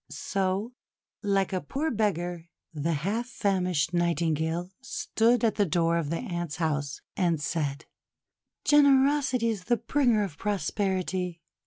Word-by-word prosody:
So, 195 Hz, +4 st, -2 dB, 0.5 s
like 195 Hz, -2 st, +1 dB
a 185 Hz, -, 0 dB
poor 305 Hz, +4 st, -2 dB
beggar 175 Hz, -6 st, -1 dB, 0.3 s
the 160 Hz, +2 st, -1 dB
half 225 Hz, +5 st, -1 dB
famished 185 Hz, -8 st, 0 dB
Nightingale 170 Hz, 0 st, 0 dB
stood 255 Hz, -, +1 dB
at 225 Hz, -, +2 dB
the 205 Hz, -, +4 dB
door 170 Hz, +1 st, +2 dB
of 160 Hz, -4 st, -2 dB
the 165 Hz, -, -1 dB
Ant's 175 Hz, -, -4 dB
house, 150 Hz, -4 st, -2 dB
and 170 Hz, -4 st, +1 dB
said: 145 Hz, -2 st, -2 dB, 0.4 s
— -, -, -60 dB
"Generosity 280 Hz, -4 st, +4 dB
is 205 Hz, -5 st, -3 dB
the 240 Hz, 0 st, +2 dB
bringer 235 Hz, -3 st, +2 dB
of 170 Hz, -7 st, -6 dB
prosperity! 190 Hz, -3 st, -1 dB
185 Hz, 135 wpm, -28 LUFS, 170-230 Hz, 0.5 s, the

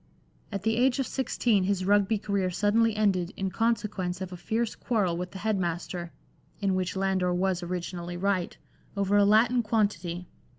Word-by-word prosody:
At 200 Hz, -2 st, -4 dB
the 225 Hz, +1 st, +1 dB
age 250 Hz, +1 st, +3 dB
of 270 Hz, -, 0 dB
sixteen 235 Hz, -7 st, +1 dB
his 190 Hz, -1 st, 0 dB
Rugby 205 Hz, +2 st, +3 dB
career 200 Hz, -2 st, -1 dB
suddenly 215 Hz, +4 st, +2 dB
ended 195 Hz, -4 st, +1 dB
in 190 Hz, -1 st, -2 dB
consequence 205 Hz, -6 st, -1 dB
of 190 Hz, -1 st, -5 dB
a -, -, -5 dB
fierce 220 Hz, +6 st, -1 dB
quarrel 205 Hz, -8 st, 0 dB
with 180 Hz, +1 st, -4 dB
the 190 Hz, -, -9 dB
head 210 Hz, +1 st, 0 dB
master 175 Hz, 0 st, -3 dB, 0.5 s
(in 195 Hz, -2 st, +1 dB
which 185 Hz, 0 st, -1 dB
Landor 190 Hz, -2 st, +1 dB
was 185 Hz, 0 st, 0 dB
originally 175 Hz, 0 st, -4 dB
right) 190 Hz, -1 st, -1 dB, 0.4 s
over 200 Hz, 0 st, +1 dB
a 205 Hz, 0 st, +6 dB
Latin 225 Hz, +4 st, +4 dB
quantity. 190 Hz, -6 st, -1 dB
195 Hz, 170 wpm, -28 LUFS, 180-215 Hz, 0.5 s, a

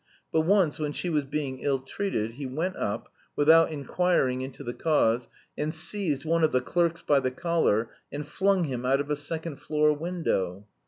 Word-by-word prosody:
But 160 Hz, -, +3 dB
once, 175 Hz, -3 st, +3 dB
when 150 Hz, -1 st, -2 dB
she 175 Hz, -, -2 dB
was 150 Hz, -3 st, +1 dB
being 135 Hz, -2 st, -3 dB
ill 140 Hz, -1 st, +1 dB
treated, 130 Hz, -, -3 dB
he 135 Hz, +3 st, -6 dB
went 165 Hz, +8 st, -2 dB
up 100 Hz, -, -3 dB, 0.3 s
(without 160 Hz, +2 st, +6 dB
inquiring 145 Hz, -3 st, +1 dB
into 130 Hz, 0 st, -7 dB
the 120 Hz, -, -4 dB
cause) 125 Hz, -7 st, +2 dB, 0.3 s
and 150 Hz, +1 st, -1 dB
seized 160 Hz, -3 st, -2 dB
one 165 Hz, +1 st, +2 dB
of 155 Hz, -, +4 dB
the 130 Hz, -, +3 dB
clerks 170 Hz, +6 st, 0 dB
by 145 Hz, -2 st, +4 dB
the 130 Hz, -1 st, 0 dB
collar 130 Hz, -, +1 dB, 0.2 s
and 145 Hz, +1 st, -4 dB
flung 195 Hz, +3 st, +2 dB
him 130 Hz, -5 st, -3 dB
out 135 Hz, +2 st, +3 dB
of 145 Hz, +1 st, -3 dB
a -, -, +2 dB
second 155 Hz, +1 st, -5 dB
floor 150 Hz, 0 st, +2 dB
window. 145 Hz, -, -2 dB
150 Hz, 190 wpm, -27 LUFS, 130-165 Hz, 0.3 s, without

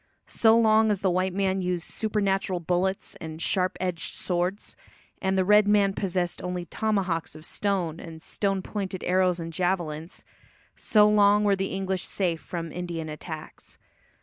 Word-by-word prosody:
So 225 Hz, 0 st, +4 dB
long 220 Hz, -1 st, +4 dB
as 205 Hz, -2 st, 0 dB
the 190 Hz, -2 st, +2 dB
white 185 Hz, +1 st, +1 dB
man 190 Hz, -1 st, +1 dB
used 180 Hz, -2 st, -1 dB
supernatural 195 Hz, -4 st, -1 dB
bullets 180 Hz, +3 st, -1 dB
and 160 Hz, 0 st, -7 dB
sharp 185 Hz, +2 st, 0 dB
edged 180 Hz, -3 st, -3 dB
swords 180 Hz, +3 st, -2 dB, 0.5 s
and 190 Hz, 0 st, +1 dB
the 185 Hz, -, +2 dB
red 210 Hz, +1 st, +5 dB
man 205 Hz, -1 st, +4 dB
possessed 180 Hz, -3 st, -2 dB
only 180 Hz, -1 st, -3 dB
tomahawks 190 Hz, -7 st, -1 dB
of 155 Hz, 0 st, -11 dB
stone 180 Hz, -6 st, -1 dB
and 165 Hz, -1 st, -9 dB
stone 195 Hz, +3 st, -2 dB
pointed 195 Hz, -3 st, -4 dB
arrows 180 Hz, -1 st, +2 dB
and 165 Hz, 0 st, -6 dB
javelins, 170 Hz, -2 st, -2 dB, 0.5 s
so 210 Hz, -1 st, +4 dB
long 210 Hz, 0 st, +5 dB
were 200 Hz, -1 st, +3 dB
the 195 Hz, 0 st, -2 dB
English 190 Hz, -1 st, -2 dB
safe 175 Hz, -4 st, -1 dB
from 170 Hz, -3 st, -5 dB
Indian 170 Hz, -2 st, -4 dB
attacks. 155 Hz, +1 st, -9 dB
185 Hz, 155 wpm, -26 LUFS, 175-200 Hz, 0.5 s, red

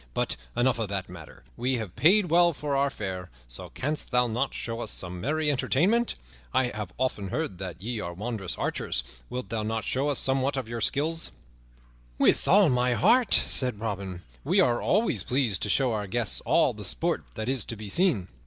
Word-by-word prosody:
But -, -, 0 dB, 0.2 s
enough 120 Hz, 0 st, +2 dB
of 110 Hz, -3 st, -2 dB
that 95 Hz, -2 st, -3 dB
matter. 85 Hz, -7 st, -12 dB
We 130 Hz, -, 0 dB
have 110 Hz, -7 st, -5 dB
paid 175 Hz, -, +4 dB
well 170 Hz, 0 st, +5 dB
for 145 Hz, -1 st, -3 dB
our 140 Hz, +1 st, +2 dB
fare, 95 Hz, -8 st, -5 dB, 0.2 s
so -, -, -8 dB
canst 150 Hz, +3 st, -3 dB
thou 125 Hz, -1 st, +3 dB
not 120 Hz, +4 st, -1 dB
show 115 Hz, 0 st, -4 dB
us -, -, -4 dB
some 90 Hz, -1 st, -3 dB
merry 155 Hz, -, +1 dB
entertainment? 185 Hz, -, +2 dB, 0.4 s
I 130 Hz, -2 st, +3 dB
have 105 Hz, -5 st, -6 dB
oft 130 Hz, -3 st, 0 dB
heard 100 Hz, -, -3 dB
that 90 Hz, -4 st, -6 dB
ye 115 Hz, +4 st, -3 dB
are 85 Hz, -4 st, -4 dB
wondrous 100 Hz, 0 st, -4 dB
archers; -, -, -1 dB, 0.3 s
wilt 125 Hz, -6 st, -5 dB
thou 110 Hz, -1 st, -2 dB
not 110 Hz, +1 st, -2 dB
show 135 Hz, +3 st, 0 dB
us 145 Hz, -, +1 dB
somewhat 135 Hz, +1 st, +1 dB
of 130 Hz, -4 st, -3 dB
your 115 Hz, 0 st, -5 dB
skill?" 150 Hz, +8 st, +1 dB, 1.0 s
"With -, -, +3 dB
all 195 Hz, -3 st, +6 dB
my 125 Hz, -1 st, +2 dB
heart," 235 Hz, -, +4 dB
said 125 Hz, -6 st, +3 dB
Robin, 100 Hz, -5 st, -4 dB, 0.2 s
"we -, -, +2 dB
are 120 Hz, -, +3 dB
always 215 Hz, +5 st, +2 dB
pleased 125 Hz, -7 st, +1 dB
to 105 Hz, -, +1 dB
show 130 Hz, +4 st, +3 dB
our 105 Hz, -2 st, -2 dB
guests 115 Hz, +2 st, -1 dB
all -, -, +4 dB
the -, -, -9 dB
sport -, -, +1 dB
that 110 Hz, +1 st, -4 dB
is 130 Hz, -1 st, +1 dB
to 115 Hz, -, -4 dB
be 105 Hz, -1 st, -8 dB
seen. 125 Hz, -, +2 dB
120 Hz, 200 wpm, -27 LUFS, 100-140 Hz, 1.0 s, all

